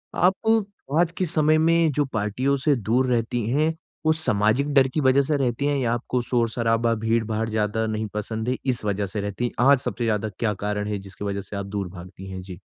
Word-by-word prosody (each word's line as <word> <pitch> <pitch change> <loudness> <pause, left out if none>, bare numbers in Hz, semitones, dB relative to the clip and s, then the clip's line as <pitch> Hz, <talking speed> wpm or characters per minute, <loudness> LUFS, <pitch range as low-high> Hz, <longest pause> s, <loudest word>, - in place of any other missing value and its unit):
आपको 200 - +1
आज 170 -1 +3
के 185 - +1
समय 155 -1 +3
में 165 0 +3
जो 145 +1 +1
पार्टियों 110 +6 0
से 145 +1 +2
दूर 120 +3 +1
रहती 120 -1 0
हैं, 155 +5 +2 0.3
वो 155 - +5
सामाजिक 135 -1 +1
डर 135 -2 +5
की - - 0
वज़ह 130 0 +4
से 145 +2 0
रहती 130 0 0
हैं 145 0 +1
या 120 -4 +1
आपको 120 +1 -1
शोर-शराबा 115 -1 +1
भीड़-भाड़ 110 0 0
ज़्यादा 110 0 0
नहीं 110 0 -2
पसंद 110 +2 -3
है, 130 - 0
इस 125 -4 -1
वज़ह 100 0 0
से 100 +2 -4
रहती 100 +4 -3
हैं 120 0 0
और 140 +1 +7
सबसे 125 -2 -4
ज़्यादा 110 -1 0
क्या 110 -3 +1
कारण 105 0 -1
है 105 -1 -2
जिसकी 95 +1 -9
वज़ह 100 0 -2
से 100 +1 -9
आप 100 0 -3
दूर 100 -1 -3
भागती 90 +1 -10
हैं? 95 0 -6
जी। 90 -1 -9
115 Hz, 215 wpm, -24 LUFS, 105-140 Hz, 0.3 s, और